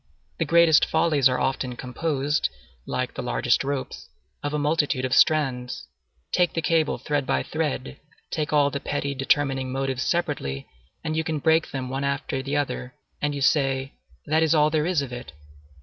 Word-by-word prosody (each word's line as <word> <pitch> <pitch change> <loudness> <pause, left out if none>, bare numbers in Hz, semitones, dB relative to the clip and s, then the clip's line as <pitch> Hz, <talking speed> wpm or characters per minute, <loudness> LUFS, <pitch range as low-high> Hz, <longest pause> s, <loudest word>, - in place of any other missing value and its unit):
The 165 - +1
greatest 165 -1 +5
follies 155 -5 +3
are 125 - 0
often 130 -2 -1
composed, 145 +3 -1 0.4
like - - -2
the - - -5
largest - - +1
ropes, 140 -1 -4 0.3
of 145 - -2
a 150 - -1
multitude 145 -3 +1
of 130 - -1
strands. 130 -5 +2 0.5
Take 175 -2 +2
the 165 - -1
cable 160 -2 +2
thread 145 -3 -2
by 65 0 +1
thread, 65 - -3 0.3
take 150 -1 -2
all 145 -1 +3
the 140 - -3
petty 140 0 -2
determining 135 -1 +1
motives 135 -1 -2
separately, 140 - -1 0.4
and 155 -1 -2
you 160 - +1
can 160 -1 -2
break 160 +2 +2
them 130 -2 -4
one 135 +1 -2
after 140 -1 -1
the 140 +2 -2
other, 130 -3 -3 0.3
and 145 -1 0
you 140 - -4
say, 135 -2 +1 0.3
"That 155 +2 +2
is 160 0 +3
all 150 0 +4
there 155 0 +1
is 175 -6 +1
of 125 -3 -7
it!" 125 -8 -8
145 Hz, 180 wpm, -25 LUFS, 130-155 Hz, 0.5 s, greatest